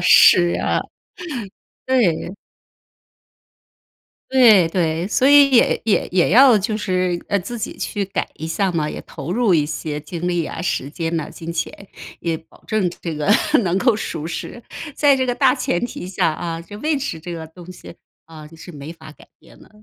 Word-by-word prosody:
是 175 0 +6
啊。 - - 0 1.1
对。 200 -8 +1 2.0
对 225 -10 +6
对， 165 0 -1
所 250 +5 +2
以 285 0 +7
也 240 - +4
也 220 - +1
也 180 -1 +2
要 245 +3 +7
就 210 +2 -2
是， 185 -4 -1
呃， 200 - +2
自 220 +7 -6
己 - - -5
去 205 -1 -3
改 190 - -3
一 160 - -6
下 190 +4 0
嘛， 155 -3 -1
也 - - -6
投 175 - -8
入 225 -3 +2
一 155 - +3
些 150 -1 -4
精 170 +3 -5
力 175 -1 0
啊， - - -7
时 145 -5 -2
间 165 +2 -3
呐， 160 - -3
金 165 0 -7
钱， 170 +4 -5 0.3
也 165 -1 -2
保 160 - -21
证 215 -5 0
这 165 - -4
个 150 +4 -2 0.3
能 180 0 0
够 240 +1 +3
舒 160 -7 -5
适， 175 +7 -6 0.3
在 285 -2 +4
这 260 - 0
个 245 - 0
大 265 -1 +4
前 240 -6 -1
提 200 -6 -7
下 180 -3 0
啊， 165 0 -5
就 205 +5 -11
位 305 +3 0
置 265 - -4
这 175 +2 -8
个 165 -1 -6
东 175 +2 -12
西， 175 - -12 0.3
啊， 155 -1 -12
是 180 - -11
没 145 0 -9
法 165 -2 -13
改 - - -18
变 - - -20
的， - - -18
180 Hz, 195 characters per minute, -20 LUFS, 165-215 Hz, 2.0 s, 以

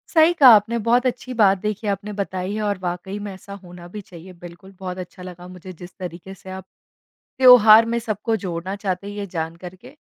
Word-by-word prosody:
सही 320 +1 +6
कहा 270 - +9
आपने, 220 +3 +1
बहुत 235 +3 +1
अच्छी 255 0 -3
बात 200 -4 +3
देखिए 210 +1 -4
आपने 200 +1 -4
बताई 190 -1 -4
है 215 - -3
और 205 -2 -2
वाक़ई 180 +3 -5
में 205 -1 -7
ऐसा 190 +1 -13
होना 175 -1 -13
भी 210 - -5
चाहिए 185 -1 -13
बिल्कुल, 175 +2 -14
बहुत 185 -1 -6
अच्छा 180 0 -10
लगा 180 -1 -11
मुझे 185 0 -11
जिस 175 +1 -13
तरीके 180 +1 -8
से 190 0 -13
आप 190 0 -8 0.7
त्यौहार 230 -4 +7
में - - 0
सबको 225 0 -3
जोड़ना 175 +2 -4
चाहते 195 -1 -4
हैं 205 - -7
ये 205 -1 -5
जान 165 -2 -5
कर 180 +1 -11
के। 250 +9 -16
190 Hz, 215 wpm, -21 LUFS, 180-215 Hz, 0.7 s, कहा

